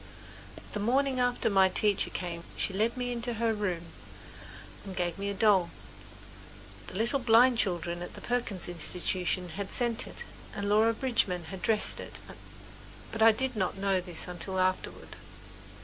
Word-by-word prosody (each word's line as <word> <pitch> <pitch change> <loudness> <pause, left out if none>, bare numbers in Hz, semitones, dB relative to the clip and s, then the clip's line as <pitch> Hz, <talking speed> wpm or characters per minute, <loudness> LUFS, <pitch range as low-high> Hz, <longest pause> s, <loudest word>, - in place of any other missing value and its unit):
The 210 - -2
morning 260 +4 +1
after 245 0 +1
my 195 -3 +5
teacher 205 +1 +2
came 170 -2 -5
she 195 - 0
led 220 +5 +1
me 245 0 -2
into 240 0 -3
her 225 0 +1
room 185 -5 -2 1.0
and 195 -2 -7
gave 175 -1 -2
me 200 0 -2
a - - -2
doll. 195 -4 +4 1.2
The - - -9
little 235 +7 +1
blind 240 0 +5
children 175 -3 -1
at 175 - -7
the - - -10
Perkins 235 -7 -1
Institution 180 +1 -1
had 195 +4 -5
sent 240 -1 +1
it - - -5 0.3
and 200 0 -2
Laura 220 +2 +4
Bridgman 215 -9 0
had 190 - -7
dressed 215 -2 +3
it; - - -6 0.9
but 225 - -4
I 225 0 +9
did 260 +3 -1
not 190 -2 -1
know 195 -1 +1
this 175 -2 -7
until 180 +2 -4
afterward. 185 0 -1
200 Hz, 160 wpm, -30 LUFS, 185-230 Hz, 1.2 s, I